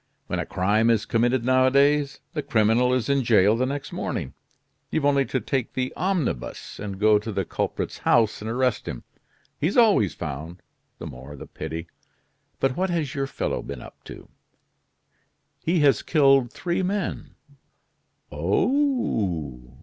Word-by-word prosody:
When - - -3
a - - -3
crime 105 +5 +2
is 110 -2 +2
committed 120 +2 +1
nowadays, 140 +3 +3
the 150 - -2
criminal 115 +1 +2
is 125 -3 0
in 140 -1 +2
jail 110 -2 +4
the 130 +2 0
next 140 +1 -4
morning, - - -4 0.6
you've 155 -3 -1
only 140 -1 +3
to 130 +2 -1
take 125 +2 -2
the 130 0 -2
omnibus, 175 - -2
and 100 -2 -6
go 105 0 +5
to 110 +2 -6
the 95 -2 -2
culprit's - - -3
house 110 -3 +2
and 110 - -4
arrest 125 0 0
him. - - -5 0.6
He's 165 - 0
always 210 - +4
found, 80 +3 -6 0.3
the - - -8
more 65 +4 -9
the 70 - -9
pity. 80 +1 -6 0.7
But 135 -1 +1
what 190 +1 0
has 160 -6 -1
your 135 -1 -2
fellow - - -3
been 70 -3 -7
up - - -14
to?" - - -11 1.3
"He 170 0 +1
has 140 -6 +4
killed 135 -5 +3
three 175 +1 -2
men." 190 0 -3 1.0
"Oh! 85 - -1
125 Hz, 150 wpm, -24 LUFS, 105-145 Hz, 1.3 s, go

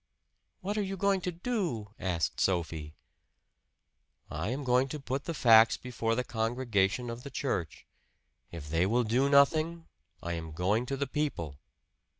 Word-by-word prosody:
"What 205 +3 -2
are - - +2
you 195 -1 -3
going 195 0 +2
to 180 - -2
do?" 170 - -3
asked 90 -3 -1
Sophie. 80 -4 -1 1.4
"I 80 +7 -3
am 135 +4 -3
going 125 +1 +3
to 150 +2 -5
put 135 0 -4
the 170 - -3
facts 115 -4 +6
before 115 -2 -2
the 125 - 0
congregation 115 -1 0
of 115 +1 -7
the 140 - -8
church. 125 - -3 0.7
If 80 -4 -8
they 85 +4 +1
will 120 +4 +2
do 125 +5 +2
nothing, 155 +4 +3 0.4
I 85 - -2
am 80 -2 -5
going 105 +9 0
to 135 - -2
the 140 - 0
people." 85 - -3
120 Hz, 155 wpm, -30 LUFS, 95-140 Hz, 1.4 s, facts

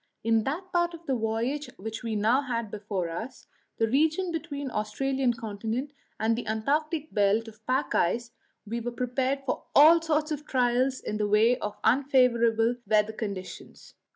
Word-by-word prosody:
In 225 -1 +2
that 350 +7 -4
part 345 -1 +1
of 335 0 -15
the 270 - 0
voyage 235 +5 -1
which 220 +3 -6
we 230 -2 -3
now 225 +6 +3
had 235 -6 -3
before 200 -4 -3
us 220 +10 -7 0.3
the 225 - +2
region 315 +8 +1
between 290 -4 -4
the - - -12
Australian 255 +5 0
continent 230 +5 -4 0.3
and 225 +1 +2
the 240 - -5
Antarctic 300 +8 -1
belt 205 +3 +2
of 220 0 -13
pack 260 +2 0
ice 235 +7 +1 0.3
we 230 +3 -3
were 240 - -3
prepared 255 +3 -1
for - - -3
all 320 +4 +8
sorts 310 -1 0
of 300 0 -4
trials 255 +1 +1
in 210 - -3
the 210 -1 0
way 215 +4 +4
of 210 - -4
unfavourable 240 -3 +3
weather 215 0 +2
conditions. 200 -4 -7
240 Hz, 170 wpm, -27 LUFS, 220-280 Hz, 0.3 s, all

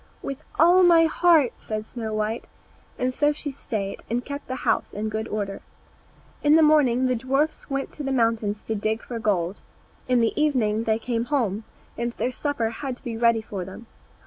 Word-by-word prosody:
"With 275 0 -4 0.2
all 350 +3 +6
my 340 -2 +6
heart," 320 -5 +4
said 215 0 -5
Snow 225 -1 -5
white; 215 +2 -2 0.5
and 255 0 0
so 295 +3 +3
she 295 -1 -4
stayed, 215 -7 -4
and 240 +2 -1
kept 285 +1 -6
the 260 - -3
house - - +1
in 215 +1 -2
good 220 +1 -3
order. 200 -3 -3 0.8
In 295 +1 +5
the 320 - +6
morning 270 -5 +4
the 255 -1 +2
dwarfs 270 +8 -1
went 275 0 -2
to 295 - -6
the 270 - -2
mountain 230 -4 +1
to 225 - -1
dig 220 +1 -1
for 235 -2 -5
gold; 195 -4 0 0.5
in 250 -1 +3
the 230 -1 +2
evening 230 -8 +1
they 220 -1 +2
came 230 0 -2
home, 225 -6 -1 0.3
and 235 0 -1
their 250 - -1
supper 250 -4 -1
had 260 +1 -5
to - - -18
be 235 -2 -4
ready 230 -1 +3
for 200 -4 -5
them. 190 +6 -10
235 Hz, 195 wpm, -25 LUFS, 220-280 Hz, 0.8 s, all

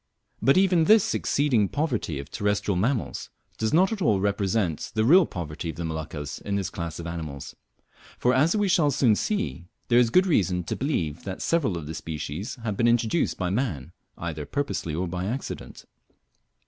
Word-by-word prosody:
But 135 - +4
even 185 -4 +4
this 215 +3 +5
exceeding 125 -9 +1
poverty 130 - -1
of 70 +1 -8
terrestrial 105 -1 0
mammals 115 +6 -1 0.3
does 110 - 0
not 185 +6 +4
at 220 -3 -3
all 105 - +3
represent 100 -3 0
the 110 0 +2
real 175 +6 +6
poverty 80 -1 -5
of 80 - -5
the 85 +1 -4
Moluccas 80 -2 -5
in 100 - -3
this 100 -1 -2
class 85 -2 -5
of 85 - -7
animals; 75 -5 -6 0.6
for, 125 - +2
as 155 +8 +3
we 205 -1 +2
shall 170 -5 +3
soon 130 -5 +3
see, 205 - -2 0.2
there 120 0 +6
is 120 -2 +4
good 185 +9 +4
reason 90 - +1
to - - -3
believe 85 - -2
that 95 -1 -5
several 140 - +1
of 80 - -6
the 80 - -6
species 80 - -5
have 105 -3 -2
been 120 - +3
introduced 120 +6 +1
by 90 -1 -1
man, 95 - -2 0.3
either 80 -3 -4
purposely 140 - -2
or 90 +3 -1
by 90 +1 -3
accident. 125 +7 -5
105 Hz, 185 wpm, -26 LUFS, 85-140 Hz, 0.6 s, real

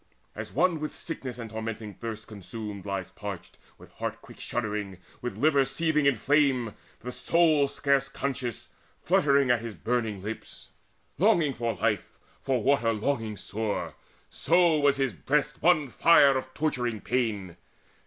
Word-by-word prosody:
As - - -6
one 170 +2 +2
with 155 0 -4
sickness 135 -7 -6
and 115 -3 -7
tormenting 110 -1 -5
thirst 110 -1 -6
Consumed, 105 0 -7
lies 95 -2 -3
parched, 95 -2 -8 0.2
with - - -16
heart - - -4
quick - - -15
shuddering, 105 -5 -3 0.2
With 125 - -4
liver 145 -2 +4
seething 150 +2 +1
as 140 - +5
in 115 - -11
flame, 135 -5 +2 0.3
the 125 - -5
soul, 155 0 +3
Scarce 140 -1 +1
conscious, 130 -4 -4 0.3
fluttering 140 -3 +4
at 120 -2 +2
his 115 -3 -6
burning 110 -5 -2
lips, 110 +2 -8 0.5
Longing 170 -7 +4
for 115 -2 -2
life, - - -1 0.2
for 130 -4 0
water 130 -4 +3
longing 110 -1 -2
sore; 105 +1 -3 0.4
So 170 -2 +3
was 140 -1 +3
his 135 -2 0
breast 150 +1 -1
one 155 -5 +4
fire 140 -3 +6
of 130 0 -3
torturing 125 -7 -1
pain. 105 -7 -1
125 Hz, 150 wpm, -28 LUFS, 110-145 Hz, 0.5 s, fire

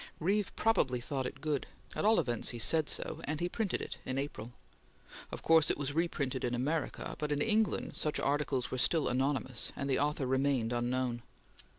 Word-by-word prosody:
Reeve 195 +4 +1
probably 130 - +2
thought 130 +1 -3
it 135 +1 -9
good; 150 -3 -1 0.3
at - - -1
all 220 +2 +5
events, 120 -3 +1
he 120 - -4
said 155 +6 +4
so; - - 0
and 150 0 -2
he 175 - 0
printed 205 +1 -1
it - - -7
in 130 0 -3
April. 130 -5 -4 0.8
Of - - -6
course 160 -1 +5
it - - +1
was 145 0 -2
reprinted 145 -5 -1
in 120 0 0
America, 150 +6 -2
but 150 -1 -2
in 145 - +1
England 220 +4 +1
such 150 - 0
articles 140 -3 0
were 130 - -2
still 160 +4 +3
anonymous, 130 -1 -1
and 140 - -3
the 135 - +1
author 145 -1 0
remained 130 -2 +1
unknown. 120 0 -1
140 Hz, 190 wpm, -32 LUFS, 130-155 Hz, 0.8 s, all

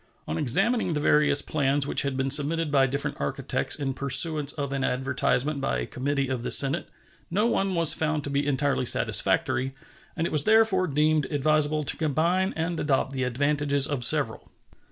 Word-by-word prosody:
On 80 - -4
examining 195 - +1
the 150 - -2
various 145 -1 +2
plans 140 -2 -1
which - - +1
had 140 -2 -3
been 135 0 -1
submitted 150 +2 +2
by 135 -2 +2
different 140 +2 -5
architects - - -3
in 135 -2 -4
pursuance 145 +2 +3
of 140 -2 -5
an 135 -1 -3
advertisement 135 +2 -1
by 135 - -2
a - - -4
committee 140 +1 -3
of 130 -2 -4
the - - -5
Senate 140 +4 +4 0.4
no 205 +6 0
one 195 -5 -1
was 165 -2 +5
found 155 -2 -2
to 140 - -6
be 140 +1 -2
entirely 140 -2 -1
satisfactory, 130 +2 +1 0.4
and 165 - -2
it - - -4
was 150 -2 +1
therefore 215 -4 +2
deemed 150 +1 0
advisable 155 +1 0
to - - -2
combine 170 +5 -1
and 165 +1 -4
adopt 135 -2 -1
the 130 - -4
advantages 140 +2 0
of 140 -4 -4
several. 135 -4 0
145 Hz, 180 wpm, -25 LUFS, 135-155 Hz, 0.4 s, was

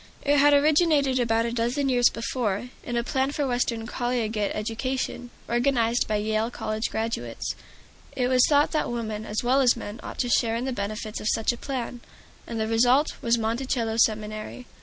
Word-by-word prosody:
It 285 0 +3
had 290 +1 +6
originated 290 -2 +3
about 230 -1 +2
a 235 - -2
dozen 240 +4 0
years 245 -2 +4
before, 230 -1 -2
in 240 -1 -3
a 235 - +1
plan 265 +1 0
for 290 - -1
Western 245 -3 -1
collegiate 235 -4 -1
education, 245 +3 -3 0.2
organized 240 -1 +1
by 215 - 0
Yale 215 +2 0
College 215 -2 -3
graduates. 220 - -3 0.6
It 250 -1 +1
was 255 0 +4
thought 290 0 +4
that 310 - 0
women 220 -2 -4
as 210 +3 -2
well 260 +3 +3
as 245 -2 +4
men 215 -1 -7
ought - - -8
to 245 - 0
share 230 -1 +2
in 240 +2 -2
the 265 - -2
benefits 215 0 -4
of - - -3
such 225 - +1
a - - -5
plan, 245 -2 -5 0.5
and 230 -1 -4
the 220 - 0
result 245 +6 +3
was 235 0 +2
Monticello 230 0 -1
Seminary. 215 +2 -1
235 Hz, 180 wpm, -25 LUFS, 220-255 Hz, 0.6 s, had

